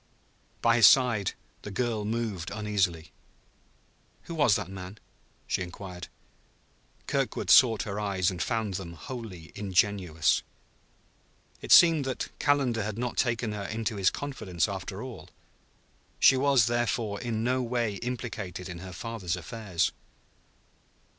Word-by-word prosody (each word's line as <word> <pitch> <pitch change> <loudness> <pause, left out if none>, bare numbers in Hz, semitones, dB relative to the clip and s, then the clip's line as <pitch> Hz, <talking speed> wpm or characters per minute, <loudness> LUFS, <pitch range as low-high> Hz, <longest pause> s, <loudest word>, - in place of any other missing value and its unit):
By 115 0 +4
his 115 -5 +9
side 120 -7 +4 0.3
the - - -7
girl 110 0 -2
moved 110 -5 -3
uneasily. 100 -6 -1 1.1
"Who 170 - -7
was 145 -10 +4
that 100 -4 -2
man?" 95 +1 -8 0.5
she - - -1
inquired. 90 -1 -7 1.0
Kirkwood - - -1
sought 115 -5 +6
her 100 0 -4
eyes, 95 -3 0
and 90 -2 -5
found 110 -3 -1
them 90 -2 -5
wholly 95 -3 -8
ingenuous. 95 -4 +1 1.2
It - - -6
seemed 165 -4 +8
that 130 -1 -3
Calendar 135 -6 +2
had 105 0 -4
not 125 0 -3
taken 120 -2 0
her 105 -1 -5
into 110 +1 -3
his 95 -2 +4
confidence, 110 - -2
after - - -5
all. - - -9 0.9
She - - +7
was, 135 -3 +4
therefore, 115 -3 -1
in 115 -2 -2
no 130 +2 +1
way 120 -4 -1
implicated 110 -7 -5
in 90 -1 -7
her 90 +1 -8
father's 95 -2 -4
affairs. 95 0 -2
105 Hz, 130 wpm, -28 LUFS, 95-120 Hz, 1.2 s, his